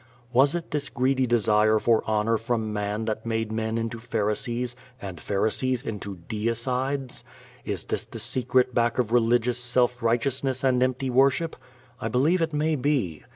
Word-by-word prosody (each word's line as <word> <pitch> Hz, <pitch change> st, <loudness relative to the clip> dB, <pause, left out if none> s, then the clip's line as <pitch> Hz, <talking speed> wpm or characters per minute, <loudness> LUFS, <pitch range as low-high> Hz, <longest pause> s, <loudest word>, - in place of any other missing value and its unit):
Was 135 Hz, +5 st, +4 dB
it 170 Hz, -1 st, -5 dB
this 150 Hz, -1 st, -2 dB
greedy 130 Hz, +1 st, +1 dB
desire 110 Hz, -2 st, +3 dB
for 110 Hz, +1 st, +3 dB
honor 110 Hz, +1 st, +2 dB
from 115 Hz, -2 st, -2 dB
man 105 Hz, +1 st, -2 dB
that 110 Hz, 0 st, -3 dB
made 115 Hz, -1 st, -2 dB
men 110 Hz, 0 st, -1 dB
into 115 Hz, 0 st, -3 dB
Pharisees 120 Hz, +3 st, -2 dB, 0.2 s
and 95 Hz, -5 st, -7 dB
Pharisees 115 Hz, +5 st, 0 dB
into 100 Hz, -6 st, -5 dB
Deicides? 125 Hz, +4 st, -2 dB, 0.4 s
Is -, -, -2 dB
this -, -, -2 dB
the -, -, -9 dB
secret 125 Hz, +2 st, +1 dB
back 120 Hz, 0 st, +1 dB
of 120 Hz, -3 st, 0 dB
religious 120 Hz, 0 st, +2 dB
self 125 Hz, 0 st, +1 dB
righteousness 130 Hz, +3 st, +1 dB
and 130 Hz, -2 st, +3 dB
empty 130 Hz, +1 st, 0 dB
worship? 135 Hz, +6 st, +3 dB, 0.4 s
I -, -, -2 dB
believe 145 Hz, +10 st, +2 dB
it 165 Hz, -1 st, 0 dB
may 155 Hz, +1 st, +1 dB
be. 125 Hz, -, -1 dB
120 Hz, 155 wpm, -26 LUFS, 110-130 Hz, 0.4 s, Was